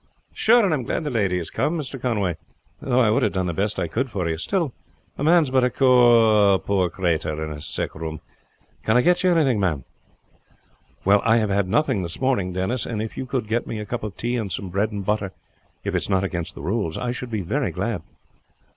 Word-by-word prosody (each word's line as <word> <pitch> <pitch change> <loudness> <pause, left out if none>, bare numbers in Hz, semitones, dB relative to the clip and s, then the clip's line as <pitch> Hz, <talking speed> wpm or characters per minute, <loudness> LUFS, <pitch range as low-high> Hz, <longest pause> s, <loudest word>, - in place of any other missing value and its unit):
"Sure, 235 0 +4
and 180 - +2
I - - +2
am - - -4
glad 125 - -2
the 150 - -3
lady 100 -6 +1
has 85 - -5
come, 165 +3 0
Mr. 135 -4 -6
Conway; 105 -8 0 0.5
though 125 -1 +1
I 115 -4 +4
would 110 - +2
have 105 - +1
done 95 -1 0
the 85 - -2
best 100 +5 -1
I - - -1
could 130 +3 -2
for 95 -6 -2
you. 80 - 0
Still, 165 - -1 0.4
a - - -4
man 165 +2 +5
is 135 - -4
but 130 -1 +3
a 125 - +2 0.9
poor 95 -3 0
crater 80 -4 -1
in 75 - -6
a 75 -1 -7
sick 80 - -4
room. 80 -1 -6 0.6
Can 110 +2 +3
I 125 - +4
get 180 +1 +3
you 185 - +4
anything 145 -10 +3
ma'am?" 80 -9 0 1.2
"Well, 100 +1 +5
I 115 0 +4
have 110 -3 +1
had 100 -1 +1
nothing 115 -3 +1
this 85 -1 -5
morning, 125 -9 +1
Denis; 95 +6 -2
and 110 -3 -3
if 110 +1 -4
you 130 - -5
could 125 -4 -2
get 115 +2 -1
me 115 - -4
a 105 - -5
cup 120 +4 -4
of 105 -3 -6
tea 120 +1 -1
and 105 -5 -3
some 95 +2 -4
bread 100 +4 0
and 100 -2 -5
butter, 105 -2 -1 0.5
if - - -3
it - - +2
is - - -6
not 95 -1 +2
against 85 -3 -3
the - - -9
rules, 95 -2 -1
I 125 -1 -2
should 125 0 -6
be 110 -3 -2
very 125 - -1
glad." 100 0 -3
105 Hz, 240 wpm, -23 LUFS, 95-125 Hz, 1.2 s, man